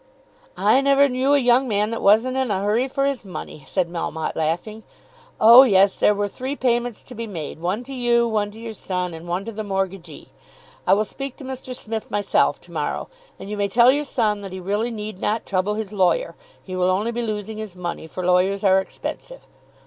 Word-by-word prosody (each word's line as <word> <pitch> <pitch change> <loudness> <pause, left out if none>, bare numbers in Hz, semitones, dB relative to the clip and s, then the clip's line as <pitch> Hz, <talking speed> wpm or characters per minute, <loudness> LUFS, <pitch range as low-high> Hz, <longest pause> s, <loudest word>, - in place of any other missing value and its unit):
"I 270 - +4
never 280 0 +4
knew 265 +2 +2
a - - +5
young 250 0 +3
man 210 -1 +1
that 230 - -3
wasn't 225 +6 +4
in 265 -2 0
a 195 -1 -1
hurry 220 +6 +1
for 275 +1 -1
his 275 -4 -1
money," 180 -6 -8
said 185 -3 0
Melmotte 165 -2 -4
laughing. 175 +8 -2 0.6
"Oh, 235 +4 +10
yes; 200 -6 +4
there 210 - +4
were 205 0 -1
three 260 +7 -5
payments 240 -3 -1
to - - -12
be 230 -1 -5
made; 160 -6 -6
one 185 +8 -2
to 270 +2 -9
you, 240 -2 +2
one 210 -2 0
to 215 +2 -13
your 230 -1 -6
son, 180 -3 -3
and 165 +1 -9
one 180 +3 -2
to 230 - -5
the 215 0 -5
mortgagee. 195 -2 -4 0.6
I - - +6
will 215 +2 +1
speak 275 +3 -6
to 285 - -12
Mr. 260 -1 -6
Smith 225 -2 -5
myself 205 -1 +1
to - - -17
morrow - - -3 0.3
and - - -9
you 210 - -3
may 200 0 +1
tell 235 +4 +5
your 290 +2 0
son 215 -7 0
that 195 -2 -7
he 190 - -5
really 205 +6 -1
need 215 -4 -6
not 215 +3 -1
trouble 195 +2 0
his 215 -1 -5
lawyer. 200 - +1 0.3
He 185 - -7
will 180 0 +2
only 205 +5 0
be 235 +1 -3
losing 215 -1 -4
his 215 -4 -7
money, 175 -2 -5
for 180 +2 -5
lawyers 185 +2 +2
are 190 -1 +5
expensive. - - -7
210 Hz, 215 wpm, -22 LUFS, 190-245 Hz, 0.6 s, Oh